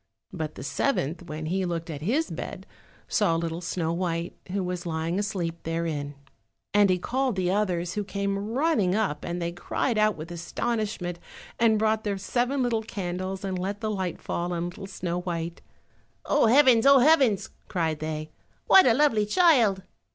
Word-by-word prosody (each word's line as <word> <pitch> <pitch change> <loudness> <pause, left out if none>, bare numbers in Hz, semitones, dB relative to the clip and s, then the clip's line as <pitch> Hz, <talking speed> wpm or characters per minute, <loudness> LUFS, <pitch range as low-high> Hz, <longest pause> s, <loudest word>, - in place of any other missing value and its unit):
But 155 -3 -4
the - - -8
seventh 170 - -1
when 155 0 -5
he 190 +4 0
looked 170 -1 -3
at 145 -2 -6
his 265 - 0
bed - - -6 0.4
saw 200 -7 +2
little 165 0 -2
Snow 170 -2 -2
white, 170 -1 -2 0.2
who 195 0 -1
was 180 -1 -4
lying 165 +3 -1
asleep 175 -5 -3
therein. 160 -3 -3 0.6
And 205 -1 +5
he 185 - +3
called 255 +5 -1
the 185 -1 0
others, 180 -4 0
who 210 - -2
came 200 +1 -2
running 235 - +2
up, 200 -9 -1
and 175 0 -3
they 170 0 -2
cried 215 +6 -1
out 215 -3 +3
with 160 +2 -8
astonishment, 180 0 -3 0.4
and 225 -2 +4
brought 220 0 +1
their 205 -2 -1
seven 250 +7 0
little 235 -2 +1
candles 190 -2 -4
and 190 -2 -2
let 195 +3 -3
the 215 -1 -1
light 190 -4 -3
fall 175 +1 -3
on 170 0 -2
little 195 0 -9
Snow 175 -2 -3
white. 170 -1 -4 0.6
"Oh, - - +3
heavens! 255 -1 +6
oh, 275 0 +8
heavens!" 265 - +4 0.2
cried 160 -5 -1
they, 155 0 -4 0.3
"what 380 - +7
a 225 - +5
lovely 235 -7 +3
child!" 235 - +4
190 Hz, 175 wpm, -26 LUFS, 170-220 Hz, 0.6 s, oh